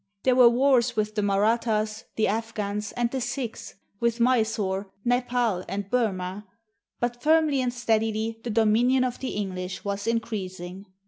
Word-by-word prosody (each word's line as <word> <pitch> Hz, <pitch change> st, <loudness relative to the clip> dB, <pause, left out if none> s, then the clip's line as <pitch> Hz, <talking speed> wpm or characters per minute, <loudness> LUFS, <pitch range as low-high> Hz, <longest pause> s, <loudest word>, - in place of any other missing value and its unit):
There 260 Hz, -, +4 dB
were 250 Hz, -2 st, +8 dB
wars 250 Hz, 0 st, +3 dB
with 215 Hz, 0 st, -1 dB
the 210 Hz, -, 0 dB
Marathas, 215 Hz, +1 st, +1 dB
the 220 Hz, -, +2 dB
Afghans, 210 Hz, -1 st, -2 dB
and 240 Hz, -1 st, 0 dB
the 265 Hz, -, -2 dB
Sikhs, 245 Hz, -4 st, -4 dB, 0.2 s
with 235 Hz, 0 st, 0 dB
Mysore, 220 Hz, -5 st, +1 dB, 0.2 s
Nepal, 245 Hz, -5 st, +1 dB
and 200 Hz, 0 st, -4 dB
Burma; 200 Hz, -4 st, -1 dB, 0.5 s
but 240 Hz, 0 st, -2 dB
firmly 310 Hz, -2 st, +3 dB
and 250 Hz, -1 st, 0 dB
steadily 225 Hz, -2 st, 0 dB
the 240 Hz, -, -4 dB
dominion 230 Hz, +4 st, +3 dB
of 250 Hz, -1 st, -2 dB
the 265 Hz, -, -4 dB
English 185 Hz, -2 st, -4 dB
was 200 Hz, +1 st, -3 dB
increasing. 195 Hz, -5 st, -3 dB
225 Hz, 145 wpm, -26 LUFS, 205-245 Hz, 0.5 s, were